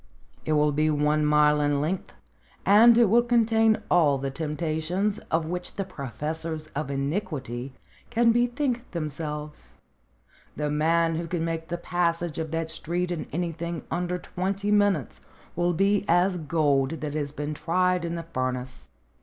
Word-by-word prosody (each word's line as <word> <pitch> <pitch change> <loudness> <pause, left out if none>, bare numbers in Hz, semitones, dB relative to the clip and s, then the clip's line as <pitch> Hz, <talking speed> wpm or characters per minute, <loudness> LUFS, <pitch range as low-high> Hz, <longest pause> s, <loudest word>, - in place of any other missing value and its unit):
It 155 - +1
will 150 0 +3
be 155 +2 +1
one 150 0 +2
mile 150 0 +4
in 145 -1 +1
length, 170 +6 -3 0.5
and 225 +4 +7
it 240 - +6
will 225 +4 +5
contain 225 -2 +3
all 155 -6 +4
the 135 0 -3
temptations 160 +6 -2
of 160 0 +1
which 180 +2 -4
the 195 - -1
professors 155 - -5
of 145 -1 -2
iniquity 140 - -3 0.3
can 235 0 +4
bethink 245 +1 0
them 160 -3 -2
selves. 150 0 -7 0.8
The 150 -1 -2
man 165 +2 +2
who 170 0 -3
can 165 -1 -2
make 165 -1 -3
the 175 - -3
passage 170 -2 -1
of 160 -1 -3
that 165 0 -2
street 175 +3 -2
in 170 -3 -4
anything 170 0 -3
under 180 0 -1
twenty 195 +3 -3
minutes 205 - +1 0.3
will 175 +1 +1
be 200 +4 +2
as 180 +2 +3
gold 150 -2 +1
that 150 -2 -3
has 145 -2 -2
been 150 +1 -4
tried 180 +3 +1
in 170 0 -3
the 170 - -4
furnace. 130 - -4
165 Hz, 155 wpm, -26 LUFS, 150-180 Hz, 0.8 s, and